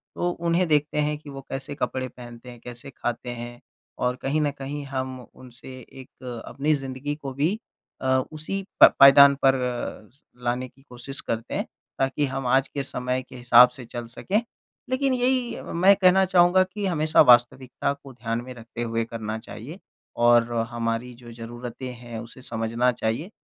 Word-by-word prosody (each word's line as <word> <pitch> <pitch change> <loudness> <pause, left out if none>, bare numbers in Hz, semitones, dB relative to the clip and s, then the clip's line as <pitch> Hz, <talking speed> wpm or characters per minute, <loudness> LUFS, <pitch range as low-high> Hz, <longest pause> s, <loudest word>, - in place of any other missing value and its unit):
तो 175 - 0
उन्हें 170 +1 0
देखते 150 -1 +1
हैं 150 0 -1
कि 150 0 -13
वो 135 -1 -8
कैसे 135 +2 -5
कपड़े 130 -2 -2
पहनते 120 0 -12
हैं, 120 -1 -11
कैसे 120 +2 -10
ख़ाते 120 -2 -4
हैं 120 0 -8 0.4
और 125 0 0
कहीं 150 +3 0
न 145 -1 +1
कहीं 140 +1 -5
हम 130 -1 -4
उनसे 130 +1 -12 0.2
एक 125 -2 -9
अपनी 150 +3 0
ज़िंदगी 135 +1 -4
को 140 -3 -7
भी 150 +9 +1 0.5
अ, 130 - -2 0.2
उसी 175 +6 -5 0.2
प - - +9
पायदान 140 0 +9
पर 135 -1 +4 0.5
स 140 - -25 0.2
लाने 125 +1 -1
की 135 - -24
कोशिश 125 +3 -6
करते 115 0 -4
हैं - - -1 0.3
ताकि 135 +2 +1
हम 135 -1 -3
आज 135 +2 +3
के 140 - -4
समय 125 -1 -2
के - - -12
हिसाब 125 0 +7
से 125 0 -7
चल 120 0 -6
सकें। 190 - -1 0.5
लेकिन 260 +1 +1
यही 250 -1 0
मैं 190 +4 +4
कहना 190 0 +5
चाहूँगा 180 0 +5
कि 200 +2 -5
हमेशा 155 -4 +3
वास्तविकता 125 +2 +3
को 140 -1 -14
ध्यान 115 -1 -3
में 130 - -8
रखते 115 0 -9
हुए 115 -1 -1
करना 110 -1 -5
चाहिए 120 - -10 0.5
और 120 0 +5 0.2
हमारी 115 +1 -2
जो 120 - -10
ज़रूरतें 120 +2 -7
हैं 120 -2 -7
उसे 115 +3 -11
समझना 115 +1 0
चाहिए। 115 - -3
130 Hz, 175 wpm, -25 LUFS, 120-150 Hz, 0.5 s, प